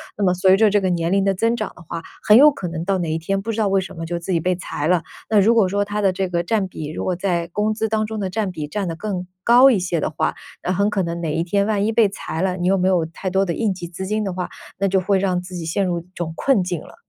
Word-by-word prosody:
那 205 - -2
么 180 -2 +3
随 185 +1 +5
着 220 +1 +5
这 205 0 +3
个 190 -2 0
年 170 0 0
龄 195 0 +2
的 195 - +3
增 230 +5 +1
长 215 -3 -4
的 - - -14
话， 165 0 -6 0.2
很 215 +2 +7
有 295 +3 +8
可 190 -10 -5
能 165 0 -5
到 195 -1 +1
哪 165 -2 -2
一 160 - 0
天 195 +4 -2
不 225 +3 -3
知 225 - -5
道 210 - +2
为 195 0 +2
什 190 -1 -9
么 165 - -4
就 170 +1 -3
自 175 +2 -5
己 170 - +2
被 180 +2 0
裁 155 -4 -4
了。 180 -2 +3 0.3
那 215 -2 +4
如 230 +4 +4
果 210 -5 +4
说 200 +2 0
它 205 +1 -3
的 195 -2 +2
这 190 0 -2
个 175 -1 0
占 200 0 0
比 155 -4 -7
如 - - -4
果 185 - 0
在 170 -3 0
工 210 +1 +1
资 220 +1 -1
当 215 0 0
中 220 0 -5
的 195 -2 -2
占 205 0 -2
比 155 -4 -5
占 195 +3 -3
得 165 - -4
更 185 -1 -4 0.2
高 250 +3 +7
一 210 - +2
些 175 -2 -1
的 - - 0
话， 155 - -1 0.3
那 180 - -1
很 200 +3 +2
可 205 -2 0
能 170 0 -4
哪 155 -2 -2
一 165 - 0
天 200 +3 +1
万 210 -2 0
一 220 - +1
被 220 -3 +4
裁 170 -4 -5
了， 185 -1 0
你 180 0 -1
又 195 +1 +3
没 185 +1 +1
有 175 -3 +2
太 175 +3 -5
多 195 +1 +2
的 170 - -1
应 215 0 0
急 175 -2 -7
资 185 +2 -6
金 215 +2 -1
的 195 -3 -3
话， 180 0 -4 0.3
那 195 - +2
就 190 0 +2
会 195 +1 +1
让 185 -2 0
自 180 0 -9
己 165 -2 -5
陷 195 +5 0
入 175 -2 -1
一 170 - -22
种 165 -3 -4
困 265 -3 +2
境 175 -3 -3
了。 - - -14
190 Hz, 350 characters per minute, -21 LUFS, 175-205 Hz, 0.3 s, 有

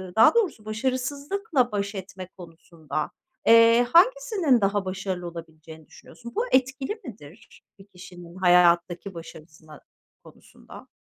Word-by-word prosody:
daha 225 - +6
doğrusu 370 - 0
başarısızlıkla 260 - -2
baş 200 0 -3
etme 190 -1 -8
konusunda, 165 -3 -7 0.4
eee, 230 +1 +6
hangisinin 390 - +3
daha 200 0 0
başarılı 185 -1 -5
olabileceğini 160 -2 -12
düşünüyorsun? 235 0 -14
Bu 460 - 0
etkili 265 - -1
midir 200 - -14 0.2
bir 195 - -15
kişinin 175 -2 -14
hayattaki 175 +1 +2
başarısına 155 -2 -13 0.4
konusunda? - - -16
200 Hz, 110 wpm, -24 LUFS, 170-255 Hz, 0.4 s, daha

